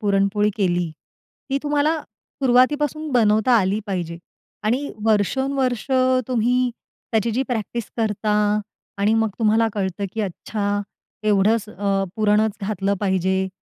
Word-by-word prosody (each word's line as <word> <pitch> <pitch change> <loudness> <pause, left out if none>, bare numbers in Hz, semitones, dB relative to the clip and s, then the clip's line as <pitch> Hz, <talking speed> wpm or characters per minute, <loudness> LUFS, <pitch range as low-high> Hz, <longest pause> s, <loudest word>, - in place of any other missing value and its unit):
पुरणपोळी 200 0 +2
केली. 175 -4 0 0.6
ती 275 - +1
तुम्हाला 295 +2 +1
सुरुवातीपासून 285 +7 0
बनवता 220 0 +3
आली 200 +1 +1
पाहिजे. 175 -4 -3 0.4
आणि 255 +7 0 0.2
वर्षोनवर्ष 250 +3 +1 0.4
तुम्ही 250 +1 +2 0.4
त्याची 220 +1 +2
जी 245 +4 0
प्रॅक्टिस 235 -1 -2
करता 215 -1 0 0.6
आणि 205 +2 +3
मग 225 -1 +2
तुम्हाला 225 0 +3
कळतं, 195 -1 -2
की 225 - -3
अच्छा, 205 +1 -2 0.4
एवढंच 215 +1 +2
अ, 195 -1 0
पुरणच 215 0 +2
घातलं 200 -1 -1
पाहिजे, 190 -1 +1
215 Hz, 115 wpm, -22 LUFS, 200-245 Hz, 0.6 s, बनवता